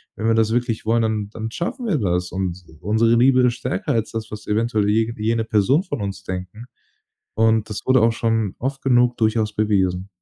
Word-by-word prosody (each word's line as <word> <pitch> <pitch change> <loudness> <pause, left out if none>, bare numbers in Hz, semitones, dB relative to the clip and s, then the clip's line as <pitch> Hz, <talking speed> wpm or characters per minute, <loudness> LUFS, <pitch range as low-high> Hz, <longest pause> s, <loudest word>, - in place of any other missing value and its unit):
wenn 110 - -2
wir 115 - +3
das 110 -1 +2
wirklich 120 -2 -1
wollen, 115 +1 +2
dann 110 -2 -1
dann 110 0 -6
schaffen 245 - -4
wir 185 -8 +1
das 90 -3 -1
und 95 -1 -3 0.2
unsere 110 +4 +2
Liebe 130 +1 +5
ist 120 -1 +1
stärker 125 +4 -3
als 115 -2 -1
das, 110 -1 -5
was 105 - -8
eventuell 110 -1 +1
je 110 +2 +1
jene 110 +1 0
Person 110 - +2
von 145 -8 -5
uns 100 -1 -5
denken“, 95 +5 -6 0.7
und 110 0 +2
das 105 - -4
wurde 130 0 +4
auch 115 0 +4
schon 115 -3 -1
oft 135 +2 -4
genug 125 -2 +3
durchaus 110 -1 +1
bewiesen. 95 -3 0
110 Hz, 200 wpm, -21 LUFS, 105-120 Hz, 0.7 s, Liebe